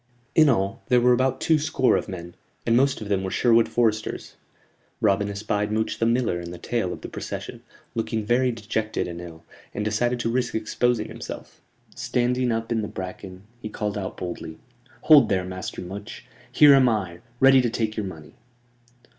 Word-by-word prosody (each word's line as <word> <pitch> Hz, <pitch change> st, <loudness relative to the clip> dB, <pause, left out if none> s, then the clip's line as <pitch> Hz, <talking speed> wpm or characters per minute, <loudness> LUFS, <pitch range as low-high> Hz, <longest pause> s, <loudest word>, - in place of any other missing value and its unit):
In 155 Hz, -2 st, +6 dB
all, 100 Hz, -6 st, 0 dB
there 125 Hz, -2 st, +4 dB
were 125 Hz, +1 st, +4 dB
about 130 Hz, +1 st, +1 dB
two 160 Hz, -2 st, +3 dB
score 145 Hz, -3 st, +2 dB
of -, -, -2 dB
men, 85 Hz, -2 st, -7 dB, 0.3 s
and 115 Hz, -, +3 dB
most 135 Hz, 0 st, +2 dB
of 105 Hz, -, -6 dB
them 100 Hz, -2 st, 0 dB
were 95 Hz, -, -2 dB
Sherwood 115 Hz, +2 st, +3 dB
foresters. 110 Hz, -3 st, -1 dB, 0.6 s
Robin 100 Hz, -1 st, +2 dB
espied 105 Hz, +1 st, -2 dB
Much 110 Hz, +1 st, -1 dB
the 115 Hz, -, +2 dB
Miller 115 Hz, -7 st, +1 dB
in 85 Hz, -, -7 dB
the 90 Hz, -, -8 dB
tail 110 Hz, -1 st, -2 dB
of -, -, -7 dB
the -, -, -6 dB
procession, -, -, -7 dB, 0.3 s
looking 110 Hz, -1 st, -2 dB
very 125 Hz, +3 st, +2 dB
dejected 110 Hz, -1 st, -3 dB
and 85 Hz, 0 st, -7 dB
ill, 85 Hz, -1 st, -11 dB, 0.3 s
and 105 Hz, -, -2 dB
decided 120 Hz, +3 st, 0 dB
to 115 Hz, -, -1 dB
risk 125 Hz, 0 st, -1 dB
exposing 110 Hz, +1 st, 0 dB
himself. -, -, -9 dB, 0.3 s
Standing 125 Hz, 0 st, 0 dB
up 115 Hz, +1 st, -2 dB
in 115 Hz, -1 st, +1 dB
the 105 Hz, -, -3 dB
bracken, 95 Hz, 0 st, -8 dB, 0.2 s
he 110 Hz, -, -5 dB
called 105 Hz, -1 st, -3 dB
out 100 Hz, -2 st, -5 dB
boldly: 85 Hz, -3 st, -6 dB, 0.4 s
"Hold 145 Hz, -8 st, +7 dB
there, 95 Hz, -2 st, 0 dB
Master 95 Hz, 0 st, -6 dB
Much. 100 Hz, +4 st, -8 dB, 0.3 s
Here 145 Hz, +3 st, +7 dB
am 130 Hz, -2 st, +5 dB
I, 95 Hz, -6 st, -2 dB, 0.2 s
ready 135 Hz, 0 st, +7 dB
to 120 Hz, -, 0 dB
take 110 Hz, -1 st, -2 dB
your 105 Hz, -3 st, -3 dB
money." 80 Hz, -4 st, -10 dB
110 Hz, 185 wpm, -24 LUFS, 95-120 Hz, 0.6 s, Hold